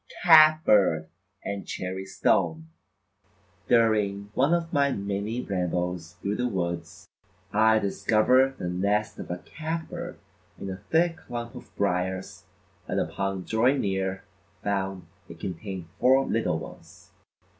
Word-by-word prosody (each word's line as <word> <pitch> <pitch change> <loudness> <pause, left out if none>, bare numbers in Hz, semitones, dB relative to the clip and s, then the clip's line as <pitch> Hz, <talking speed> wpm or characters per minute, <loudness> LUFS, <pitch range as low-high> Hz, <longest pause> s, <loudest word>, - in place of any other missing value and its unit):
Cat 155 -2 +7
Bird 80 -7 +3 0.4
and 100 -1 -4
Cherry 95 +1 -4
Stone: 80 -4 +1 1.0
During 105 -3 +2
one 135 +7 +2
of 170 -1 0
my 140 -1 +3
many 100 +3 -3
rambles 90 -2 -2
through 100 +1 -3
the 125 - 0
woods, 90 -1 -4 0.5
I 110 +1 +5
discovered 125 +6 +2
the 90 - -4
nest 100 +4 0
of - - -7
a 90 - -3
Cat 160 - -5
Bird 175 0 -6 0.4
in 95 - -5
a 95 - -5
thick 165 0 +2
clump 120 -1 -6
of - - -11
briars 95 -1 -2 0.4
and - - -1
upon 95 -1 -2
drawing 120 +8 +2
near 95 -1 -2 0.4
found 95 -2 -2 0.2
it - - -11
contained 95 0 -5
four 130 +1 +5
little 110 -8 0
ones. 90 +3 -12
100 Hz, 130 wpm, -26 LUFS, 95-125 Hz, 1.0 s, Cat